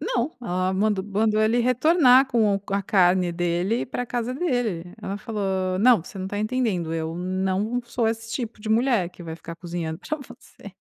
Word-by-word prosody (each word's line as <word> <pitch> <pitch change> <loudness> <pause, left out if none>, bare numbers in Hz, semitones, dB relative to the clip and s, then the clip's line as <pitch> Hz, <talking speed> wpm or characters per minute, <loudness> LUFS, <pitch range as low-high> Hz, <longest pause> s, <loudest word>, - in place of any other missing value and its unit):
Não, 255 -1 -1
ela 185 -4 -1
mandou 200 0 +1
mandou 215 +1 +1
ele 220 +3 +3
retornar 255 +2 +5
com 225 -5 +2
o 195 - -2
com 195 - -9
a 200 - +1
carne 180 -2 +3
dele 175 +5 0
e - - -2
ir - - -5
pra 245 0 -4
casa 240 0 -2
dele, 245 - -2
ela 195 - -3
falou: 190 -4 -2
"Não, 235 -4 +5
você 190 - -12
não 190 0 -4
tá 205 - -4
entendendo, 215 -7 -1
eu 160 0 -3
não 190 +6 -1
sou 235 -1 -1
esse 225 0 -4
tipo 230 -2 -4
de 215 - -6
mulher 225 -5 +2
que 180 - -13
vai 160 -1 -6
ficar 170 0 -9
cozinhando 170 -3 -5
pra 305 +10 -4
você." 275 - -13
210 Hz, 205 wpm, -24 LUFS, 185-235 Hz, -, retornar